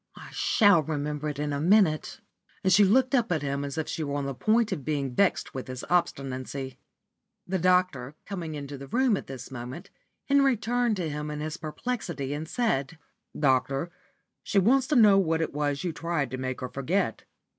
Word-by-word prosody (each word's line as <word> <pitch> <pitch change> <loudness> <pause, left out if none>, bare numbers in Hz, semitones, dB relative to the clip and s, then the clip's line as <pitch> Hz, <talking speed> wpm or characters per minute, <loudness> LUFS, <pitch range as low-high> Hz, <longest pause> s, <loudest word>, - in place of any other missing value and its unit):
I - - -11
shall 205 -7 +4
remember 150 0 -3
it 145 - -5
in 145 0 -2
a 140 - -1
minute," 175 -3 +3 0.4
and 190 - +4
she 205 +3 +7
looked 255 +7 +3
up 240 -7 +2
at 155 -4 0
him 140 0 -2
as 140 +1 -5
if 160 - -2
she 160 - -3
were 140 -1 -3
on 145 -1 -2
the 140 - -3
point 220 - +2
of 140 - -3
being 140 -4 -2
vexed 195 +9 +1
with 130 - -6
his 130 0 -6
obstinacy. 135 -5 -2 0.7
The 190 +1 -1
doctor 180 -7 +1
coming 170 -6 -5
into 140 -1 -7
the 140 - -9
room 250 - +2
at - - -6
this 135 0 -8
moment, 125 +6 -8 0.4
Henry 275 -3 +4
turned 240 0 0
to 175 -3 -2
him 150 0 -4
in 150 0 -4
his 155 +2 -4
perplexity, 160 - -4
and 155 +2 -4
said 165 - -1 0.4
"Doctor, 135 +3 +1 0.5
she - - -2
wants 255 +7 +4
to 300 - +1
know 210 -5 +7
what 165 -3 +1
it 160 - -2
was 145 0 -1
you 175 -3 -2
tried 160 -6 -2
to 130 - -3
make 130 0 -4
her 125 - -4
forget." 145 - -1
155 Hz, 200 wpm, -27 LUFS, 140-195 Hz, 0.7 s, she